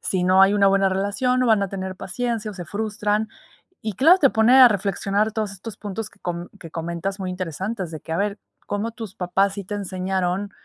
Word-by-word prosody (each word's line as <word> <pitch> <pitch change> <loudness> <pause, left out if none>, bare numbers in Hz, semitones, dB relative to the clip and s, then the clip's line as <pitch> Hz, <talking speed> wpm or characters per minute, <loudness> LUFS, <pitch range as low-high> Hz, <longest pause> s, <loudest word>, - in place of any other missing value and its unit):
si 185 -2 -1
no 185 +1 +5
hay 195 +1 +6
una 200 -1 +4
buena 195 0 +3
relación 205 +7 0
no 250 - +2
van 220 -3 +4
a 195 - -1
tener 190 -1 -5
paciencia 225 +2 -3
o 205 - -10
se 175 -3 -7
frustran. 210 +1 -1 0.5
Y 215 -1 -2
claro, 325 - +6
te 275 - +5
pone 225 +4 +5
a 255 - +11
reflexionar 200 +1 0
todos 215 -2 -2
estos 200 +2 -9
puntos 210 +1 -5
que - - -25
co 175 0 -4
que 165 - -10
comentas 170 +4 -4
muy 185 -1 -3
interesantes 185 +2 -4
de 155 - -6
que, 160 - -12
a - - 0
ver, 205 0 -1 0.3
cómo 205 +3 -2
tus 215 -3 -8
papás 195 +1 +1
sí 200 - -5
te 205 - -5
enseñaron, 190 0 -2
200 Hz, 220 wpm, -23 LUFS, 185-215 Hz, 0.5 s, a